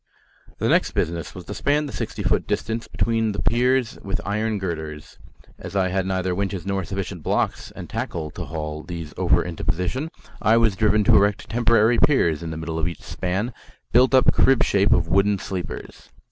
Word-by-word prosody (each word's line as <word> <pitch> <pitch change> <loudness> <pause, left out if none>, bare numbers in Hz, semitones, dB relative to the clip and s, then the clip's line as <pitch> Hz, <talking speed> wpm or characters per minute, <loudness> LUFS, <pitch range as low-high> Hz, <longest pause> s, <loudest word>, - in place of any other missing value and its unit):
The - - 0
next - - +2
business 85 +3 -2
was 90 -2 -9
to - - -6
span 150 +1 +1
the 140 - -7
sixty - - -4
foot - - +1
distance 115 +1 -2
between 115 -2 0
the 100 - -3
piers 125 +1 +2
with 95 -1 -3
iron 110 +2 -1
girders. 80 -5 -6 0.4
As - - -8
I 95 -1 +2
had 95 0 -1
neither 95 -1 0
winches 95 -2 -3
nor 95 -1 -1
sufficient 95 0 -5
blocks - - -1
and - - -7
tackle 75 -2 -4
to - - -6
haul 75 -1 -5
these 85 -3 -7
over - - +3
into 85 -2 -6
position, 90 - -1 0.3
I 110 +2 +4
was 115 -4 +3
driven 105 +1 +3
to - - +5
erect 100 +1 +2
temporary 115 0 +3
piers 85 - +3
in 85 - -5
the 80 - -5
middle 80 0 -4
of 80 - 0
each 85 - -6
span, 95 +7 -2 0.4
built 130 +2 +5
up 130 - +5
crib 135 -2 +4
shape 100 +1 +2
of 85 - +3
wooden 100 +3 +3
sleepers. 95 -1 -7
95 Hz, 190 wpm, -23 LUFS, 85-115 Hz, 0.4 s, to